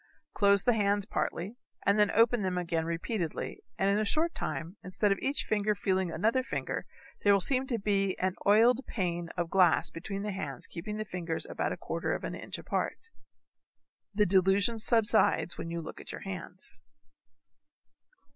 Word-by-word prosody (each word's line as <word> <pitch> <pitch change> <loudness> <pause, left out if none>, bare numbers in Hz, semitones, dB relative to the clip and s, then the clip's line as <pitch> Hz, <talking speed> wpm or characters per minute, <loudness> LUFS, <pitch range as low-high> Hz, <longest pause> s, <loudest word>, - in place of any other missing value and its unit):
Close 200 -1 +4
the 245 - +4
hands 205 -2 +1
partly 205 0 -3 0.3
and 200 +1 +3
open 230 +1 +3
them 185 -2 -1
again 165 -2 -1
repeatedly 170 +1 -3 0.2
and 195 - +1
in 200 +1 +3
a - - +1
short 315 +10 +2
time 165 +4 -4
instead 200 +3 0
of 195 - +1
each 275 +2 0
finger's 210 -1 0
feeling 190 -2 0
another 225 +8 +1
finger 255 - -4 0.4
there 205 - +5
will 200 - +5
seem 260 +6 +3
to 240 - -1
be 195 -2 0
an 185 0 0
oiled 230 +6 +5
pane 175 -4 -2
of 175 -1 -2
glass 185 -2 +4
between 195 +4 -5
the 210 - -2
hands 145 -9 -5
keeping 210 +5 -6
the 215 - -3
fingers 170 -4 -4
about - - -2
a - - -4
quarter - - -2
of - - -6
an - - -4
inch - - -5
apart. - - -2 1.1
The 210 0 +2
delusion 195 +4 +3
subsides 220 -5 +3
when 165 - -4
you 170 0 -3
look - - -8
at - - -9
your - - -7
hands. 185 -1 -7
200 Hz, 175 wpm, -30 LUFS, 180-215 Hz, 1.1 s, there